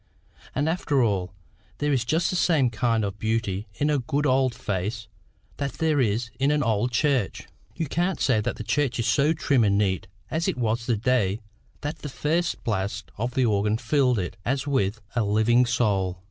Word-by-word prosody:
And 145 Hz, +3 st, +1 dB
after 150 Hz, -5 st, +1 dB
all, 95 Hz, -5 st, 0 dB, 0.5 s
there 145 Hz, 0 st, 0 dB
is 125 Hz, -3 st, +1 dB
just 160 Hz, +8 st, +1 dB
the -, -, -2 dB
same 160 Hz, -8 st, +3 dB
kind 115 Hz, -1 st, +1 dB
of 100 Hz, 0 st, -5 dB
beauty 110 Hz, -2 st, -1 dB
in 150 Hz, +1 st, +1 dB
a 145 Hz, -, +2 dB
good 140 Hz, +4 st, -1 dB
old 130 Hz, -2 st, +2 dB
face 105 Hz, -1 st, -3 dB, 0.5 s
that 140 Hz, -3 st, -3 dB
there 160 Hz, -3 st, +1 dB
is 120 Hz, +1 st, 0 dB
in 135 Hz, +1 st, +3 dB
an 150 Hz, 0 st, +2 dB
old 115 Hz, +1 st, +1 dB
church. 125 Hz, -4 st, 0 dB, 0.3 s
You 165 Hz, -, -2 dB
can't 175 Hz, +4 st, -1 dB
say 115 Hz, -5 st, +2 dB
the 110 Hz, -, -3 dB
church 135 Hz, +2 st, 0 dB
is 115 Hz, -, -1 dB
so 140 Hz, +6 st, +3 dB
trim 140 Hz, -5 st, +2 dB
and 100 Hz, -1 st, +3 dB
neat 95 Hz, -4 st, 0 dB, 0.2 s
as 160 Hz, +2 st, 0 dB
it -, -, -1 dB
was 115 Hz, -1 st, -1 dB
the 120 Hz, -3 st, +2 dB
day 110 Hz, -4 st, +1 dB, 0.4 s
that 150 Hz, +2 st, -4 dB
the 145 Hz, -, -6 dB
first 165 Hz, +5 st, -1 dB
blast 100 Hz, -2 st, -2 dB
of 120 Hz, +2 st, -2 dB
the 130 Hz, -, +3 dB
organ 105 Hz, 0 st, +1 dB
filled 125 Hz, +1 st, +2 dB
it 90 Hz, -3 st, -3 dB
as 135 Hz, +3 st, -1 dB
with, 115 Hz, -6 st, 0 dB
a 120 Hz, -, +2 dB
living 110 Hz, +4 st, +3 dB
soul. 95 Hz, -7 st, +1 dB
120 Hz, 190 wpm, -25 LUFS, 105-145 Hz, 0.5 s, same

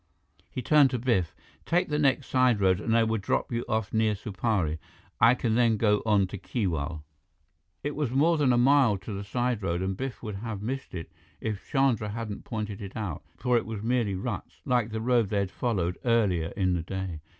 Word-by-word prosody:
He 125 Hz, -, -5 dB
turned 150 Hz, -1 st, +5 dB
to 125 Hz, -, -1 dB
Biff. 110 Hz, -, 0 dB, 0.3 s
"Take 175 Hz, 0 st, +1 dB
the 150 Hz, 0 st, 0 dB
next 140 Hz, -2 st, +2 dB
side 130 Hz, -4 st, +3 dB
road, 95 Hz, 0 st, +3 dB
and 115 Hz, +1 st, +2 dB
I 115 Hz, -, +5 dB
will 110 Hz, 0 st, 0 dB
drop 100 Hz, -, -1 dB
you 120 Hz, 0 st, -1 dB
off 110 Hz, -3 st, -1 dB
near 110 Hz, -1 st, +2 dB
Supari. 95 Hz, -6 st, -1 dB, 0.4 s
I 120 Hz, +1 st, +6 dB
can 115 Hz, -3 st, 0 dB
then 115 Hz, -1 st, +3 dB
go 105 Hz, -1 st, +3 dB
on 105 Hz, -3 st, +4 dB
to 95 Hz, +1 st, -7 dB
Keewal." 80 Hz, -, -2 dB, 0.8 s
It 145 Hz, +1 st, -3 dB
was 150 Hz, -4 st, -1 dB
more 155 Hz, +6 st, +3 dB
than 140 Hz, -3 st, +4 dB
a 120 Hz, -, +3 dB
mile 130 Hz, -4 st, +4 dB
to 100 Hz, +3 st, -7 dB
the 100 Hz, +1 st, -4 dB
side 120 Hz, +2 st, -1 dB
road, 85 Hz, -1 st, -1 dB
and 95 Hz, 0 st, -1 dB
Biff 130 Hz, +4 st, -5 dB
would 105 Hz, -3 st, -4 dB
have 105 Hz, -1 st, -5 dB
missed 130 Hz, -2 st, -4 dB
it 80 Hz, -3 st, -6 dB, 0.3 s
if 105 Hz, -3 st, -5 dB
Chandra 130 Hz, -6 st, +2 dB
hadn't 105 Hz, -1 st, -5 dB
pointed 105 Hz, -3 st, -4 dB
it 100 Hz, -1 st, -8 dB
out, 95 Hz, -8 st, -4 dB, 0.2 s
for 125 Hz, -2 st, +2 dB
it -, -, -1 dB
was 110 Hz, -2 st, -5 dB
merely 115 Hz, -4 st, +1 dB
ruts, 95 Hz, -, -5 dB
like 120 Hz, -3 st, +1 dB
the 110 Hz, 0 st, -4 dB
road 120 Hz, -3 st, +2 dB
they 105 Hz, -, 0 dB
had 100 Hz, -2 st, 0 dB
followed 95 Hz, -8 st, -1 dB
earlier 105 Hz, -9 st, +2 dB
in 95 Hz, -2 st, +2 dB
the 85 Hz, -, 0 dB
day. 90 Hz, -2 st, -5 dB
110 Hz, 210 wpm, -28 LUFS, 95-125 Hz, 0.8 s, I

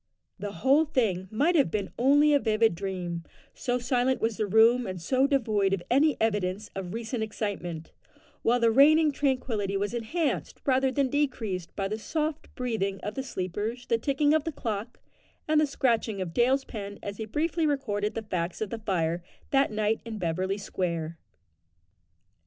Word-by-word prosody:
The 205 Hz, -1 st, -5 dB
whole 285 Hz, +4 st, +5 dB
thing 215 Hz, -, 0 dB
might 295 Hz, -, +2 dB
have 285 Hz, -5 st, +4 dB
been 205 Hz, -3 st, -3 dB
only 290 Hz, +4 st, +5 dB
a 285 Hz, -, +5 dB
vivid 220 Hz, -3 st, +2 dB
dream, 175 Hz, -2 st, -4 dB, 0.3 s
so 245 Hz, 0 st, -1 dB
silent 250 Hz, +1 st, +1 dB
was 225 Hz, 0 st, 0 dB
the 215 Hz, -, 0 dB
room 225 Hz, +4 st, +5 dB
and 185 Hz, -1 st, -5 dB
so 260 Hz, +10 st, +2 dB
devoid 215 Hz, -8 st, +1 dB
of 185 Hz, -3 st, -1 dB
any 280 Hz, +1 st, +4 dB
evidence 205 Hz, -2 st, -1 dB
of 190 Hz, 0 st, -5 dB
recent 230 Hz, +1 st, -3 dB
excitement, 195 Hz, -7 st, -4 dB, 0.5 s
while 245 Hz, +2 st, +3 dB
the 230 Hz, -1 st, +4 dB
reigning 300 Hz, +5 st, +6 dB
tranquillity 250 Hz, -8 st, -1 dB
was 205 Hz, +3 st, -2 dB
enhanced 285 Hz, +8 st, -2 dB
rather 265 Hz, -1 st, +3 dB
than 270 Hz, 0 st, +1 dB
decreased 225 Hz, -, -2 dB
by 195 Hz, -1 st, -1 dB
the 215 Hz, +2 st, -4 dB
soft 310 Hz, +4 st, -3 dB
breathing 215 Hz, -6 st, -2 dB
of 210 Hz, -, -3 dB
the 265 Hz, -, -3 dB
sleepers, 215 Hz, +1 st, -4 dB
the 230 Hz, -1 st, +1 dB
ticking 290 Hz, +3 st, +2 dB
of 315 Hz, -2 st, +3 dB
the 325 Hz, -, -3 dB
clock, 225 Hz, -4 st, -4 dB, 0.5 s
and 310 Hz, 0 st, +4 dB
the 305 Hz, -, +2 dB
scratching 230 Hz, -7 st, 0 dB
of 180 Hz, -3 st, -4 dB
Dale's 260 Hz, +5 st, +2 dB
pen 205 Hz, -3 st, -7 dB
as 200 Hz, 0 st, -5 dB
he 220 Hz, -, -4 dB
briefly 315 Hz, +7 st, 0 dB
recorded 215 Hz, -7 st, -1 dB
the 225 Hz, -, -3 dB
facts 180 Hz, -4 st, -3 dB
of 215 Hz, -3 st, -3 dB
the 230 Hz, -, -4 dB
fire 175 Hz, -5 st, -1 dB, 0.3 s
that 275 Hz, -1 st, +4 dB
night 215 Hz, +1 st, 0 dB
in 230 Hz, -2 st, -6 dB
Beverly 185 Hz, +2 st, -1 dB
Square. 170 Hz, -5 st, -3 dB
225 Hz, 175 wpm, -28 LUFS, 195-270 Hz, 0.5 s, reigning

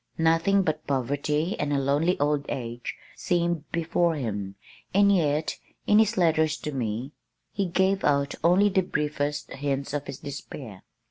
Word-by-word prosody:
Nothing 165 Hz, +5 st, +3 dB
but 155 Hz, -2 st, -2 dB
poverty 145 Hz, -, 0 dB
and 145 Hz, 0 st, -1 dB
a 145 Hz, -, +2 dB
lonely 145 Hz, +6 st, +1 dB
old 145 Hz, 0 st, +1 dB
age 120 Hz, -1 st, -4 dB, 0.2 s
seemed 170 Hz, -3 st, -1 dB
before 170 Hz, 0 st, +1 dB
him, 105 Hz, -8 st, -4 dB, 0.4 s
and 200 Hz, 0 st, +5 dB
yet, 155 Hz, -3 st, 0 dB, 0.3 s
in 210 Hz, -, +5 dB
his 220 Hz, 0 st, +3 dB
letters 160 Hz, -3 st, +3 dB
to 150 Hz, -, -3 dB
me, 120 Hz, 0 st, -3 dB, 0.4 s
he 200 Hz, -2 st, -1 dB
gave 190 Hz, +2 st, +1 dB
out 140 Hz, -1 st, +2 dB
only 185 Hz, +5 st, +5 dB
the 190 Hz, -1 st, +2 dB
briefest 150 Hz, -3 st, -2 dB
hints 140 Hz, 0 st, -2 dB
of 145 Hz, -1 st, -3 dB
his 130 Hz, -, -6 dB
despair. 135 Hz, -7 st, -8 dB
150 Hz, 150 wpm, -26 LUFS, 140-175 Hz, 0.4 s, and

